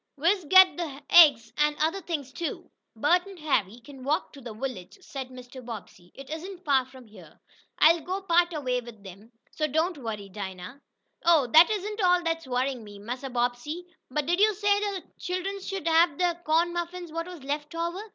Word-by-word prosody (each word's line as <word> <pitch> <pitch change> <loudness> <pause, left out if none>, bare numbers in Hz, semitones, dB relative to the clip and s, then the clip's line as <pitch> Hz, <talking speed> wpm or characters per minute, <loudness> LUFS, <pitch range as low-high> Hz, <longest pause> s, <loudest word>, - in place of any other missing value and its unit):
"We's 345 +5 +1
got 375 +2 +6
t' - - 0
hab 285 -3 -8
eggs, 260 -10 +7
an' 300 0 +2
other 325 +6 0
things 295 -6 -5
too." 335 +1 -5 0.2
"Bert 350 - +2
and 390 -2 -11
Harry 240 - -1
can 265 +1 -12
walk 295 +4 -1
to 280 - -12
the 240 -2 -8
village," 220 -5 -6
said 270 -8 -7
Mr. 255 0 -11
Bobbsey. 210 -6 -10
"It 275 0 -11
isn't 360 +3 -7
far 270 -3 +3
from 260 -1 -15
here. 215 -1 -16 0.4
I'll 325 +2 +5
go 375 +4 -4
part 345 -1 +3
way 250 -1 0
with 230 -4 -13
them. 195 +4 -13 0.2
So 305 - -1
don't 320 +3 0
worry, 215 -5 -5
Dinah." 190 +5 -8 0.4
"Oh, 330 -5 +5
dat 315 - +7
isn't 420 0 -3
all 360 -1 +3
dat's 330 -3 -2
worryin' 255 -1 -1
me, 205 -1 -11
Massa 245 +6 -6
Bobbsey. 245 +7 -2 0.2
But 295 +3 -1
did 350 +4 +1
yo' 425 +1 +5
say 405 +1 +2
de 405 -3 -3 0.2
chillums 375 +2 -4
could 390 -5 -4
hab 325 -2 +4
dem 350 -1 +1
corn 330 +2 +2
muffins 345 0 -5
whut 330 +2 -4
was 350 -6 -10
left 295 +3 -4
over?" 340 +3 -3
305 Hz, 195 wpm, -27 LUFS, 250-350 Hz, 0.4 s, eggs